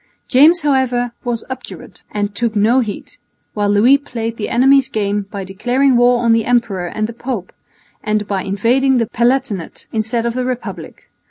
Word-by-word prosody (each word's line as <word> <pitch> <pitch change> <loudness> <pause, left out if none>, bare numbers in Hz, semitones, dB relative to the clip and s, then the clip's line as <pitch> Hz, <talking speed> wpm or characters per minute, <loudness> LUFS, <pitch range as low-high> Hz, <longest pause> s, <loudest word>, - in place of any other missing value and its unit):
James, 310 +7 +5
however, 260 -4 +1
was 240 -2 -3
obdurate 260 0 -9
and 205 -1 -3
took 230 +1 -2
no 220 +5 +3
heed, 215 -5 -5 0.4
while 205 -1 0
Louis 235 +7 +4
played 230 -4 -5
his 210 - -2
enemy's 265 +2 +4
game 205 -3 -2
by 200 -2 -6
declaring 245 +8 +1
war 245 0 +3
on 230 -1 +4
the 225 0 +2
Emperor 225 -7 0
and 215 +5 -2
the 230 - -6
Pope, 235 -5 -5 0.5
and 215 -1 -1
by 195 -2 -1
invading 245 +8 +1
the 230 - +1
Palatinate 235 -6 -1
instead 225 +1 -1
of 235 - -1
the 255 +1 -2
Republic. 250 -1 -6
235 Hz, 170 wpm, -17 LUFS, 210-255 Hz, 0.5 s, James